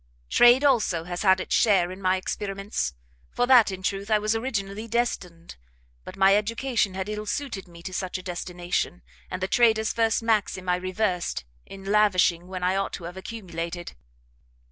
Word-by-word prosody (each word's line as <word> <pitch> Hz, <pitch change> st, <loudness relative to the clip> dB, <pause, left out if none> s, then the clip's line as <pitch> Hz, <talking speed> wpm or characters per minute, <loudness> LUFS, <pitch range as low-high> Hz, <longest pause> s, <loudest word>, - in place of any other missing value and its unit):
"Trade, 240 Hz, +3 st, +6 dB
also, 220 Hz, -, +2 dB
has 175 Hz, +1 st, -5 dB
had 190 Hz, -2 st, +4 dB
its -, -, -3 dB
share 190 Hz, -5 st, +3 dB
in 185 Hz, +1 st, -9 dB
my 185 Hz, 0 st, +2 dB
experiments; 195 Hz, -, -3 dB, 0.3 s
for 245 Hz, -, 0 dB
that, 245 Hz, -4 st, +6 dB
in 190 Hz, -1 st, -6 dB
truth, 200 Hz, +1 st, -2 dB
I 215 Hz, -, +4 dB
was 215 Hz, +1 st, 0 dB
originally 220 Hz, -3 st, -3 dB
destined, 190 Hz, -8 st, -3 dB, 0.5 s
but -, -, -10 dB
my 195 Hz, 0 st, +5 dB
education 220 Hz, -1 st, 0 dB
had 190 Hz, 0 st, -3 dB
ill 210 Hz, 0 st, -5 dB
suited 250 Hz, -10 st, -4 dB
me 170 Hz, -1 st, -14 dB
to 185 Hz, -, -6 dB
such 185 Hz, 0 st, -3 dB
a 185 Hz, -, -10 dB
destination, 175 Hz, 0 st, -3 dB, 0.3 s
and 185 Hz, 0 st, -4 dB
the -, -, +1 dB
trader's 220 Hz, 0 st, +3 dB
first 225 Hz, 0 st, +1 dB
maxim 210 Hz, -4 st, 0 dB
I 180 Hz, -, +3 dB
reversed, 185 Hz, -, -2 dB, 0.2 s
in 195 Hz, 0 st, -10 dB
lavishing 195 Hz, -4 st, +2 dB
when 185 Hz, -1 st, -6 dB
I 185 Hz, +1 st, +2 dB
ought 195 Hz, 0 st, -1 dB
to 175 Hz, -, -6 dB
have 175 Hz, +2 st, -7 dB
accumulated. 175 Hz, -4 st, -6 dB
195 Hz, 175 wpm, -25 LUFS, 180-220 Hz, 0.5 s, Trade